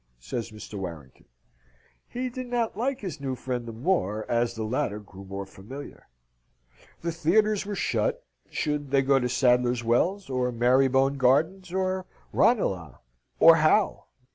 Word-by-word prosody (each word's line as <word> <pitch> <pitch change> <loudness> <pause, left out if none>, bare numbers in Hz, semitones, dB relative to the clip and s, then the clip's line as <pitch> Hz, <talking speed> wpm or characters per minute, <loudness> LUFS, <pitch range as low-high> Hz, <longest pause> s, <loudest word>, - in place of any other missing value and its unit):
says 110 - -4
Mr. 105 -1 -8
Warrington. 80 -8 -8 0.8
He 255 +1 -3
did 255 0 -6
not 240 -4 -1
like 255 +5 -1
his 165 -8 -6
new 135 -2 -2
friend 125 -1 -4
the - - -5
more 110 - -1
as 120 0 0
the 110 - -3
latter 110 -2 -1
grew 100 -2 -13
more 100 0 -6
familiar. 110 +9 -11 0.9
The 170 - -2
theatres 200 +6 +2
were 205 - -3
shut. - - -1 0.2
Should 150 -2 -2
they 135 0 +3
go 135 0 +4
to 125 -1 -1
Sadler's 125 -1 +2
Wells? 175 - +1
or 125 -1 -1
Marybone 135 +3 +3
Gardens? 160 +8 +2
or 185 0 -1 0.3
Ranelagh? 95 - +2 0.4
or 165 0 +8
how? 155 +7 +2
135 Hz, 145 wpm, -27 LUFS, 115-185 Hz, 0.9 s, or